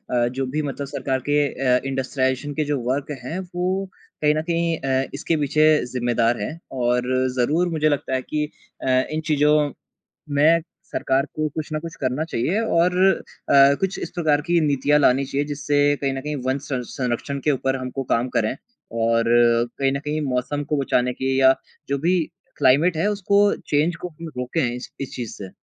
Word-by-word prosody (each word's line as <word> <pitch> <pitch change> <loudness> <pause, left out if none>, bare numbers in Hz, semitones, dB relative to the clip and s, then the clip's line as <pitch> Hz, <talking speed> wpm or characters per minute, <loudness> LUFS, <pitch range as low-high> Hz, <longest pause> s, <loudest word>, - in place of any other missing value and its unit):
अ, 120 -1 +3
जो 130 +2 -2
भी 150 +4 -2
मतलब 140 -1 -4
सरकार 135 -1 -2
के 145 0 +3 0.3
अ, - - -1
इंडस्ट्रिलाइज़ेशन 135 +1 -1
के 155 - 0
जो 145 -1 -1
वर्क़ 140 +3 -1
हैं 160 +9 -4 0.2
वो 185 +2 0 0.4
कहीं 150 0 +3
न 155 - 0
कहीं 165 0 0
अ, 135 0 0
इसके 155 +3 -1
पीछे 150 +1 +2 0.2
ज़िम्मेदार 120 -2 0
हैं। 105 - -3 0.2
और 125 0 +1
ज़रूर 160 +8 +2
मुझे 155 -2 +1
लगता 145 -2 -1
है 130 - 0
कि 150 +3 -2 0.4
अ, - - -3 0.2
इन 155 - -1
चीज़ों 150 -1 +3 0.6
में 160 +4 +5 0.3
सरकार 135 +1 0
को 155 0 0
कुछ 155 -2 -4
न 155 - 0
कुछ 165 0 -7
करना 130 +4 0
चाहिए 165 - -1
और 180 -4 +2 0.5
अ, 140 0 +7
कुछ 195 0 -1
इस - - -5
प्रकार 155 -4 +2
की 175 0 +4
नीतियाँ 145 +1 +3
लानी 135 -1 +3
चाहिए 140 +2 -2
जिससे 145 0 0 0.2
कहीं 135 -1 0
न 135 - -3
कहीं 150 +2 -4
वन 130 +1 +1
सं 130 -3 -1
संरक्षण 130 +2 -2
के 150 - +3
ऊपर 135 0 0
हमको 130 +1 -4
काम 120 +2 0
करें। 110 -1 +1 0.5
और 115 0 +2 0.5
कहीं 135 -1 +2
न 140 - -1
कहीं 150 +1 -2
मौसम 135 +2 -1
को 150 - -1
बचाने 125 -2 +1
की 130 +1 -1
या 130 0 +7 0.3
जो 140 0 0
भी 175 +5 +2 0.4
क्लाइमेट 155 +7 +4
है 165 +6 +1
उसको 200 0 +2 0.3
चेंज़ 155 +4 +1
को 180 - -4
हम 165 0 -9
रोकें 125 +5 -1
इस 125 +1 -7
इस 135 - -5
चीज़ 120 -3 -5
से। 100 - -7
140 Hz, 190 wpm, -22 LUFS, 130-155 Hz, 0.6 s, अ